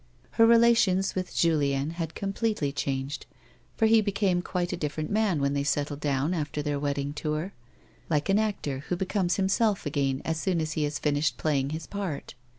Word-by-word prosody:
Her 225 0 +5
relations 230 -5 +4
with 185 -1 -4
Julien 145 -3 +2
had 165 -1 -5
completely 200 -6 -1
changed, 135 0 -3 0.5
for 225 - +3
he 220 0 +6
became 200 -3 +1
quite 180 -1 -2
a - - 0
different 155 -1 -3
man 205 -6 +2
when 140 0 +1
they 140 0 0
settled 145 0 -1
down 145 +3 0
after 150 -3 -2
their 145 -1 -1
wedding 140 0 -2
tour, 155 +5 -3 0.6
like 150 -2 +1
an 195 +2 +3
actor 200 -11 -2
who 180 - +1
becomes 185 -1 0
himself 195 +1 +1
again 140 -2 -1
as 160 0 -1
soon 180 -1 0
as 155 -1 -2
he 155 -2 0
has 145 0 -2
finished 150 0 0
playing 140 -3 0
his 155 +1 -5
part. 195 -8 -5
160 Hz, 180 wpm, -27 LUFS, 145-195 Hz, 0.6 s, he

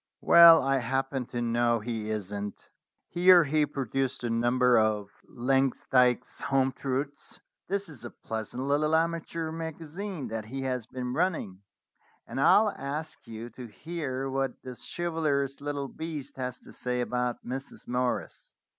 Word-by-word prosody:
"Well, 170 -1 +9
I 135 0 +2
happen 135 +1 -1
to 120 -1 -3
know 120 0 +2
he 110 -1 -4
isn't." 105 -1 -4 0.5
Here 180 0 +6
he 150 0 +2
pro 140 -2 -3
duced 135 +3 -1
the 120 -1 -2
number 120 +2 +3
of 105 -2 +2 0.2
"Langsdyke's 125 -1 +1
Home 135 -1 +2
Truths." 140 +2 -4 0.3
"This 200 +1 -1
is 140 -7 -8
a 120 - -5
pleasant 110 +4 -5
little 150 +3 +2
amateur 165 0 -1
magazine 165 +2 -5
that 110 -1 -4
he 135 +4 -5
has 125 -3 -2
been 125 -1 -4
running, 155 - -1 0.6
and 135 - -4
I'll 210 +8 +6
ask 145 -1 -5
you 115 +1 -7
to 125 -2 -9
hear 135 +1 -4
what 135 -1 -2
this 130 -2 -7
chivalrous 150 -5 -1
little 145 -1 -3
beast 155 -2 -6
has 125 -1 -3
to - - -13
say 125 0 -2
about 125 0 -2
Mrs. 135 +3 -5
Morris." 125 0 -2
135 Hz, 145 wpm, -28 LUFS, 120-155 Hz, 0.6 s, Well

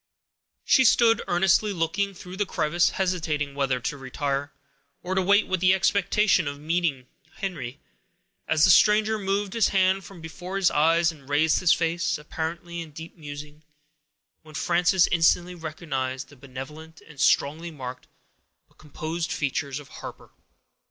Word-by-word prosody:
She 260 - +5
stood, 230 -2 +4
earnestly 190 +4 +3
looking 195 +3 -1
through 180 +1 -10
the 205 - 0
crevice, 175 +3 +1
hesitating 160 -6 -2
whether 135 -2 0
to 140 +4 -3
retire, 140 +2 -3 0.5
or 185 - -3
to 190 - +2
wait 200 +3 +4
with 185 -1 -1
the 185 +1 +4
expectation 195 -2 +2
of 145 - -3
yet 145 - -16
meeting 160 -5 -1 0.3
Henry, 145 - -5 0.7
as 155 -1 +2
the - - +7
stranger 215 +1 +4
moved 195 0 -1
his 230 -3 +3
hand 190 0 +2
from 195 -2 -12
before 175 +3 -8
his 195 -2 +3
eyes, 165 +3 +3
and 140 -4 -17
raised 150 +2 +3
his 180 - +3
face, 170 0 +1
apparently 170 +3 -5
in 165 - -8
deep 160 +2 -10
musing, 150 -1 -9 0.8
when 155 -1 -15
Frances 175 +3 +3
instantly 175 +1 +2
recognized 135 -6 -4
the 145 - -16
benevolent 140 +5 -10
and 150 -4 -16
strongly 160 +4 +2
marked, 130 -5 -8 0.6
but - - -33
composed 160 +3 -5
features 140 -3 -2
of 145 - -13
Harper. - - -10
165 Hz, 150 wpm, -25 LUFS, 145-185 Hz, 0.8 s, the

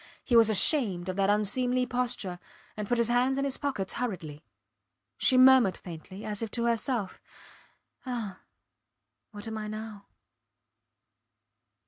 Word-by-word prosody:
He 245 - 0
was 225 -1 +6
ashamed 200 - +2
of 185 - -3
that 195 0 +2
unseemly 245 +5 +1
posture, 240 -7 -2 0.4
and 210 -1 -5
put 245 - +1
his 235 -1 +3
hands 250 +3 +2
in 275 - 0
his 270 -1 0
pockets 265 -10 -3
hurriedly. 170 -11 -5 0.8
She 260 - +4
murmured 255 -6 +6
faintly, 180 +3 -10
as 210 0 -4
if 225 - -3
to 235 - 0
herself 230 -3 -2 0.8
Ah! 235 -7 -5 0.9
What 205 +1 -9
am 220 -1 -4
I 215 - -5
now? 215 -1 -8
220 Hz, 135 wpm, -28 LUFS, 200-250 Hz, 0.9 s, was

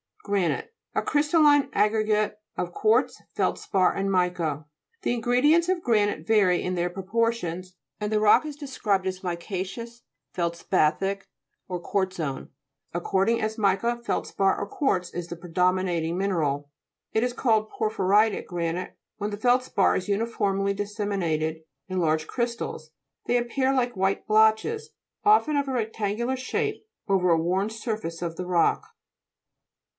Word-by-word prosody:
GRA'NITE 200 - 0 0.3
A - - +2
crystalline 295 -1 +4
aggregate 215 0 +1 0.2
of 175 - -3
quartz, 220 +7 +2
feldspar, 185 -2 +1
and 195 0 -1
mica. 175 -5 0 0.4
The - - 0
ingredients 250 +8 +3
of 370 -1 0
granite 205 -8 +1
vary 195 -5 +4
in 180 0 -2
their 175 0 0
proportions, 185 -2 -2 0.2
and 210 0 -2
the 215 - +2
rock 210 +8 +5
is 300 -2 -5
described 225 -10 -1
as 185 0 -3
mica'ceous, 190 +6 -5 0.3
feldspathic 170 +2 0 0.4
or 180 -1 -3
quartzose, 175 -6 -2 0.4
according 195 +6 +1
as 215 +1 -2
mica, 215 +3 +1
feldspar, 195 -4 0
or - - -3
quartz 190 -7 0
is 175 -1 -4
the, 170 - -6
predo 180 +1 +1
minating 175 -3 -1
mineral. 150 -7 -1 0.4
It 220 - +2
is 245 0 0
called 220 -4 +1
Por 215 -1 -2
phyritic 205 +2 +2
granite 175 +1 -3 0.2
when 210 0 -3
the 205 - -4
feldspar 245 -2 +2
is 185 - -2
uniformly 200 -2 0
disseminated 195 -7 -2 0.3
in 185 -1 -2
large 155 -2 +1
crystals; 235 -10 -3 0.3
they 245 - +2
appear 260 +3 0
like 245 -3 0
white 195 +1 0
blotches, 220 - +3 0.3
often 415 -8 +4
of 280 -1 0
a 265 - -2
rectangular 225 +2 -1
shape, 430 - -3 0.2
over 190 -3 +2
a 165 - +5
worn 185 +5 0
surface 215 -7 -4
of 170 -1 -3
the 180 - -5
rock. 180 - +2
200 Hz, 140 wpm, -26 LUFS, 180-235 Hz, 0.4 s, rock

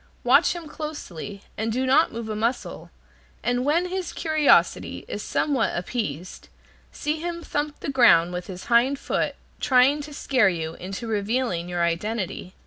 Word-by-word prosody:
Watch - - +5
him 340 -2 -7
closely, 210 - -7 0.2
and 220 +1 -1
do 255 +3 0
not 265 +5 +4
move 230 -1 -5
a 215 - -3
muscle, 230 +4 -2 0.5
and 245 0 +1
when 315 +6 +2
his 370 -1 -3
curiosity 310 -2 +2
is - - -5
somewhat 275 -11 0
appeased, 180 - -4 0.4
see 300 +1 -2
him 340 +1 -4
thump 295 -1 -3
the - - -3
ground 180 -10 +5
with 180 0 -5
his 185 -1 -8
hind 245 +4 +3
foot, - - -1 0.2
trying 265 +3 +4
to 295 +1 -9
scare 260 -7 +2
you 165 -3 -3
into 195 +7 -6
revealing 210 -4 -1
your 175 -1 0
identity. 185 +2 -2
240 Hz, 155 wpm, -24 LUFS, 185-290 Hz, 0.5 s, Watch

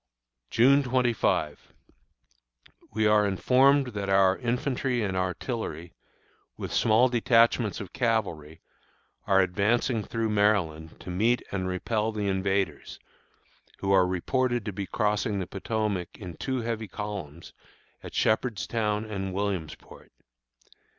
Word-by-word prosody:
June 135 +5 +5
25. 125 -3 0 1.2
We 110 0 0
are 105 -1 +4
informed 130 +7 +3
that 100 -1 -3
our 95 -1 +4
infantry 125 0 -1
and 95 -2 -2
artillery, 95 - -3 0.6
with - - -6
small 115 +3 +4
detachments 115 -3 +2
of 95 - -8
cavalry, 85 - -2 0.7
are 95 0 +5
advancing 105 +5 +1
through 115 +2 -2
Maryland 95 -7 0
to 90 - -7
meet 115 +7 +1
and 95 -2 -2
repel 105 +4 -1
the 105 -2 -3
invaders, 95 -4 -1 0.8
who 100 - -2
are 95 -2 +5
reported 120 +6 -1
to 105 - -4
be 95 0 -5
crossing 105 +2 0
the 95 - -2
Potomac 100 -2 -3
in 90 -5 -8
two 130 +5 -3
heavy 115 -1 -3
columns 95 -6 -7 0.5
at - - -10
Shepherdstown 110 -1 0
and 95 -3 -4
Williamsport. 95 -6 -5
105 Hz, 115 wpm, -27 LUFS, 95-115 Hz, 1.2 s, June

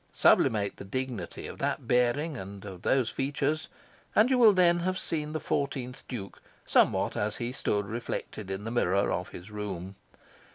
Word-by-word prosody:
Sublimate 100 -2 +3
the - - -8
dignity 125 +2 -4
of - - -8
that - - -1
bearing 125 +6 +2
and 100 -3 -8
of 95 -3 -8
those 130 -4 +2
features, 145 +3 -1 0.5
and 225 +5 +5
you 260 - +4
will 225 -3 +9
then 175 -3 +4
have 185 +2 -1
seen 150 -4 -2
the 155 - -2
fourteenth 130 -4 -2
Duke 100 -6 -7 0.2
somewhat - - +3
as 105 +1 -1
he 120 0 -3
stood 105 -5 -1
reflected 110 -2 -5
in 95 +1 -4
the 115 - -4
mirror 100 -4 +2
of 90 +1 -2
his 95 +4 -10
room. 100 -3 -5
120 Hz, 170 wpm, -29 LUFS, 100-145 Hz, 0.5 s, will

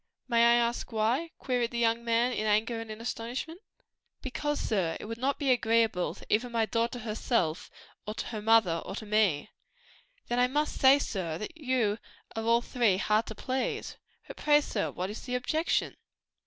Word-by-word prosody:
"May 235 -2 +4
I 235 0 +6
ask 240 +1 0
why?" 230 +9 0
queried 245 -3 -1
the 240 - -5
young 230 0 +2
man 235 +1 +2
in 215 -3 -1
anger 225 +2 +1
and 225 - -9
astonishment. 240 - -5 0.6
"Because, 295 +3 -2
sir, 185 -7 0
it - - -8
would 230 +2 -6
not 275 +3 0
be 280 -3 +1
agreeable 225 -5 +2
to - - -13
either 235 +4 +1
my 230 -1 +1
daughter 230 +2 -1
herself, 215 -7 -1 0.4
to 215 - -4
her 215 -3 -5
mother 215 -7 +4
or - - -6
to 220 - -6
me." 205 -5 +1 0.8
"Then 240 - 0
I 250 - +5
must 295 +4 -1
say, 270 +1 +8
sir, 185 - -3
that 215 - -7
you 255 -8 0 0.4
are 225 - -2
all 230 +1 +3
three 235 -6 +1
hard 215 +3 +1
to 220 - -6
please. 260 +4 -3 0.3
But - - -9
pray, 295 0 +4
sir, 215 -7 -2
what 185 +2 -4
is 215 - -7
the 250 - -1
objection?" 310 +6 0
230 Hz, 180 wpm, -29 LUFS, 215-250 Hz, 0.8 s, say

